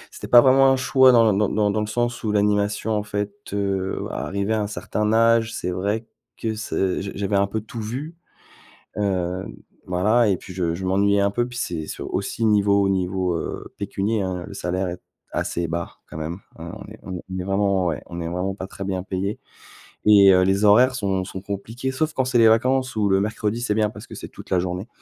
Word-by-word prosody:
c'était - - -9
pas 120 - +9
vraiment 135 +1 +5
un 135 - +4
choix 130 0 +5
dans 115 -3 +5
dans 105 +1 +1
dans 110 - 0
le 105 - -1
sens 120 +2 -2
où 110 - -1
l'animation, 105 +1 +1
en 105 -1 0
fait, 105 - -3 0.2
heu, 100 -2 -2
arrivé 100 +2 -2
à 110 - +1
un - - -1
certain 105 +1 -2
âge, 115 0 +4
c'est 90 - -3
vrai 100 +5 -2 0.3
que 110 -1 -3
c 95 -4 -1
j 100 - -5
j'avais 100 0 0
un 100 0 +2
peu 110 +2 -2
tout 110 +2 -8
vu, 130 +10 -5 0.8
hem, 95 -2 -2 0.3
voilà 105 +6 +2
et 95 - +2
puis 95 - -11
je 85 -2 -1
je 95 +2 -5
m'ennuyais 100 +2 +2
un 100 0 +3
peu 120 +4 0
puis 125 0 -8
c'est 85 -8 -2
s - - -7
aussi 100 +4 -2
niveau 100 -2 +3
niveau, 95 -1 0
heu, - - -5
pécunier, 100 +2 -1
hein, 90 -2 -3
le - - -9
salaire 90 +1 -2
est 90 0 -6 0.3
assez 85 0 -1
bas 85 +1 -4
quand - - -8
même, 80 +3 -4 0.2
hein, 85 0 -7
on - - -9
est - - -12
on 95 - -6 0.2
est - - -3
vraiment 95 -1 +1
ouais, 80 -3 -2
on 85 - -10
n'est 85 -1 -4
vraiment 90 +3 -2
pas 95 - -6
très 95 - -7
bien 95 -1 -2
payé 95 +2 -3 0.7
et 100 -2 +8
heu, 90 0 +5
les 95 +2 +2
horaires 125 +5 +6
sont 95 -5 -1
sont 95 0 -7
compliquées 110 +7 -4
sauf 155 +4 -1
quand 130 - +1
c'est 130 -1 +1
les 115 -1 +7
vacances 130 +3 +2
ou 105 -2 +1
le 95 0 +4
mercredi, 105 +2 -1
c'est 120 -3 0
bien 105 -1 +2
parce - - -11
que - - -10
c'est - - -7
toute - - -13
la 95 - +3
journée 90 +3 -3
100 Hz, 220 wpm, -23 LUFS, 95-110 Hz, 0.8 s, pas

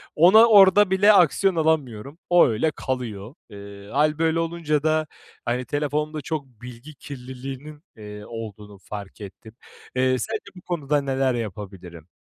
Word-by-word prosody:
ona 190 +8 +7
orada 200 -2 +6
bile 205 +3 +5
aksiyon 185 +1 +3
alamıyorum. 145 -4 -1
O, 175 0 +6
öyle 120 +8 0
kalıyor. 125 -3 -5
Eee, 100 0 -12
hâl, 150 +2 +1
böyle, 165 0 +1
olunca 165 -3 -1
da, 155 -1 +1 0.4
hani, 125 +1 -2
telefonda 150 +2 -2
çok 150 -1 -4
bilgi 125 +4 -13
kirliliğinin, 135 +3 -9
eee, 105 -1 -10
olduğunu 105 -3 -9
fark 100 +1 -10
ettim. 110 +3 -12 0.4
Eee, 130 0 +2
sence 220 0 -4
bu 180 - -12
konuda 150 -5 -1
neler 135 -1 0
yapabilirim? 95 -6 -8
135 Hz, 140 wpm, -23 LUFS, 110-160 Hz, 0.4 s, ona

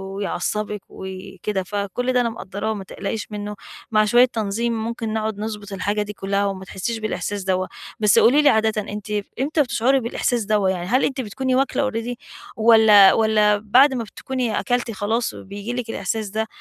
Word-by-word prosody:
ويعصبك 205 +1 -2
وكده. 190 +1 -5
فكل 205 +7 -2
ده 250 - +3
أنا 235 - 0
مقدراه 210 0 -4
ما 200 - -6
تقلقيش 205 +3 -5
منه. 210 0 -5 0.4
مع 215 -1 +4
شوية 240 +4 +6
تنظيم 230 0 -2
ممكن 230 -1 -3
نقعد 220 -1 -2
نضبط 210 -2 -5
الحاجة 205 +2 -1
دي 210 0 -5
كلها، 200 0 -1
وما 190 -1 -4
تحسيش 210 +5 -4
بالإحساس 210 -2 -3
دَوَّة. 185 0 0 0.3
بس 210 -2 +5
قولي 280 +6 +5
لي 295 - +5
عادةً 220 -3 +2
أنتِ 210 +1 -7 0.3
إمتى 300 +4 +1
بتشعُري 260 +1 +2
بالإحساس 235 0 -1
دَوَّة؟ 210 -2 +2
يعني 180 -2 -2
هل 255 +5 +2
أنتِ 270 -1 -2
بتكوني 255 +3 -2
واكلّة 270 0 +1
already 230 +1 -3 0.4
والّا 220 -3 +7
والّا 215 -1 +3
بعد 245 +7 +4
ما 245 -3 -2
بتكوني 245 +1 -3
أكلتِ 245 -2 -1
خلاص 220 +3 -1
بييجي 205 +4 -7
لِك 245 -2 -4
الإحساس 220 -2 -3
ده؟ 220 +2 -2
215 Hz, 175 wpm, -22 LUFS, 200-235 Hz, 0.4 s, والّا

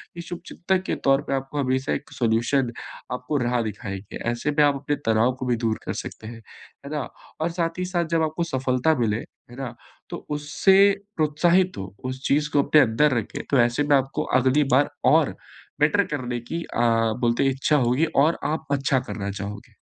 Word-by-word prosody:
कि 170 - -6
शुभचिंतक 180 +2 -3
के - - 0
तौर 135 +1 +5
पे - - -1
आपको 135 +2 -4
हमेशा 130 0 0
एक - - -5
सॉल्यूशन 120 +2 +1 0.4
आपको 125 +4 -2
राह 120 0 +1
दिखाएँगे। 100 -2 -6
ऐसे 120 +5 -2
में 150 0 +3
आप 145 -1 +3
अपने 145 +1 -2
तनाव 115 +3 +3
को 130 - -3
भी 120 -1 +1
दूर 110 -1 0
कर - - -2
सकते 110 - -9
हैं। 115 0 -9 0.4
है 145 - -7
ना? 150 - -1 0.4
और 165 - +1
साथ 170 0 -2
ही 180 - -1
साथ 175 -2 -1
जब 165 - +3
आपको 155 +2 -1
सफलता 130 +4 +1
मिले, 110 -2 +1
है 120 - -14
ना? 125 -3 -5 0.3
तो - - -7
उससे 150 +6 +2 0.4
प्रोत्साहित 170 +4 +2
हों, 95 -1 -5 0.2
उस 130 0 -6
चीज़ 150 +2 +2
को 145 - +4
अपने 150 +1 +5
अंदर 130 +3 +3
रखें, 110 - -4
तो 140 - +4
ऐसे 120 +5 +1
में 145 -1 +4
आपको 135 0 -2 0.2
अगली 130 +4 +3
बार 145 +2 +3 0.3
और 160 -3 +2 0.4
बेटर 200 +7 +3
करने 125 -3 -3
की 165 +8 -5
अ, - - -6 0.4
बोलते 120 +3 +2
हैं 135 - +3
इच्छा 135 +3 +1
होगी 130 +7 +2 0.2
और 165 - +1
आप 155 +2 -2
अच्छा 140 -1 +2
करना 100 -5 -5
चाहोगे। 100 +1 -7
135 Hz, 195 wpm, -24 LUFS, 120-150 Hz, 0.4 s, तौर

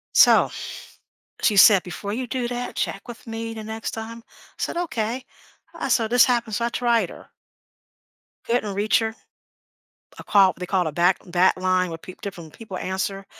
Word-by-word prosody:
So, - - +6 0.9
she 210 - +2
said, 195 -1 +8
"Before 200 +3 -6
you 255 +3 -3
do 250 0 -2
that, 245 0 -4
check 195 - -2
with 235 0 -10
me 225 0 -5
the 220 -1 -8
next 220 0 -5
time." 225 +1 -7
I - - -30 0.3
said, - - -3
"Okay." 255 -7 -2 0.5
I - - -4
so 225 -2 +2
this 245 +1 +5
happened, 235 -4 +1
so 235 - -1
I - - 0
tried 235 -6 +1
her. - - -12 1.2
Didn't 230 -4 0
reach 205 +2 +2
her. 225 0 -3 1.0
I - - -8
called 195 -3 +4
they 180 - -4
called 180 -2 0
a - - -2
back 175 +4 +3
back 180 +2 +3
line 185 -1 +1
where 165 - -6
peep 185 +3 -13
different 170 -6 -8
people 210 -5 -8
answer. 195 +1 -3
215 Hz, 180 wpm, -23 LUFS, 185-235 Hz, 1.2 s, said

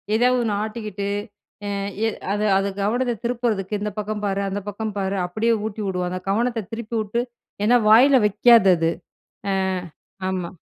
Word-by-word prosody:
ஏதாவது 250 +2 +3
ஒண்ணு 215 -2 0
ஆட்டிக்கிட்டு 215 -3 -4 0.6
எ - - -2 0.4
எ - - +2 0.2
அது 210 +1 0
அது 195 +1 0 0.2
கவனத்த 240 +4 +1
திருப்புறதுக்கு, 230 -5 -1
இந்த 210 - -2
பக்கம் 210 0 -3
பாரு, 200 0 0
அந்த 200 +1 -2
பக்கம் 210 +1 -4
பாரு, 195 0 -1
அப்படியே 220 +6 +1
ஊட்டி 220 0 -4
உடுவாங்க. 180 0 -2
கவனத்த 230 +2 0
திருப்பி 230 0 -5
உட்டு, 215 +3 -1 0.4
ஏன்னா 240 +4 +5
வாயில 260 +5 +7
வைக்காது 210 0 +6
அது. 165 0 +1 0.6
அ 195 - +1 0.7
ஆமா. 180 -2 -3
215 Hz, 150 wpm, -22 LUFS, 195-235 Hz, 0.7 s, வாயில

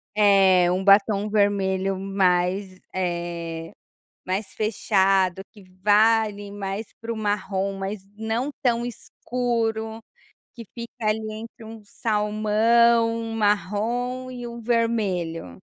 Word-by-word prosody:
É, 195 -4 +5
um 185 +1 0
batom 200 +1 +4
vermelho 195 -2 +1
mais, 190 0 0
eh, 170 -2 -3 0.5
mais 190 +1 -3
fechado, 195 -3 +1
que 205 - -16 0.2
vá, 220 +2 +5
ali, 205 -1 -7
mais 200 +1 -4
para 230 0 -4
o - - -3
marrom, 200 -2 -1
mas 195 +1 -5
não 220 +5 -2
tão 240 -2 +1
escuro, 230 -2 -3 0.5
que 235 - -10
fica 235 -1 -7
ali, 215 +1 +1
entre 225 +1 -9
um 220 0 -10
salmão, 220 +2 +2
um 225 0 -4
marrom 225 +5 -1
e 245 -1 -7
um 235 0 -7
vermelho. 205 - -1
210 Hz, 115 wpm, -24 LUFS, 190-225 Hz, 0.5 s, É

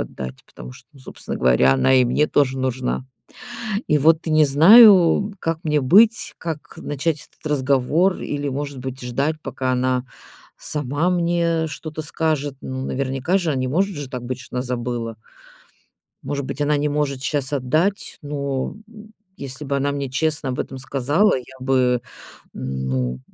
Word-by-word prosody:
отдать. 65 0 -7
Потому 60 +1 -11
что, - - -15
ну, 140 - -18
собственно 130 - -7
говоря, 65 +1 +4
она 65 - +3
и 130 -1 +5
мне 145 +5 +2
тоже 135 -3 +1
нужна. 130 0 -2 0.8
И 150 - +3
вот 160 +3 +3
не 155 -1 +4
знаю, 190 - +7
как 165 -1 -1
мне 150 -1 +1
быть? 215 - +4
Как 160 -3 -6
начать 145 +2 -3
этот - - -17
разговор? 145 +6 +2
Или, 145 -1 -3
может 140 0 -4
быть, 130 +1 -6
ждать, 135 +6 -1
пока 130 -1 -2
она 125 0 0 0.5
сама 145 +4 -1
мне 170 -2 +1
что-то 155 0 -6
скажет? 150 -2 -1
Ну, 130 0 -5
наверняка 135 +7 -1
же, 170 -4 -1
а 145 - 0
не 130 0 -1
может 190 +5 0
же 145 -2 -6
так 125 -2 -6
быть, 130 0 -4
что 130 - -9
она 125 - 0
забыла? 120 -2 -4 1.1
Может 140 -2 -3
быть, 140 +1 -5
она 145 0 +2
не 145 +1 0
может 145 -2 -1
щас 140 0 -2
отдать, 155 +9 0
но, 140 -2 -3
м, 220 -1 -15 0.2
если 140 +1 -6
бы 140 - -1
она 140 +1 0
мне 140 -2 -3
честно 150 0 -1
об 125 - -4
этом 135 - -4
сказала, 140 +9 +1
я 125 - -7 0.2
бы, 125 -2 +1 0.5
ну, 65 -1 -3
140 Hz, 165 wpm, -21 LUFS, 130-155 Hz, 1.1 s, знаю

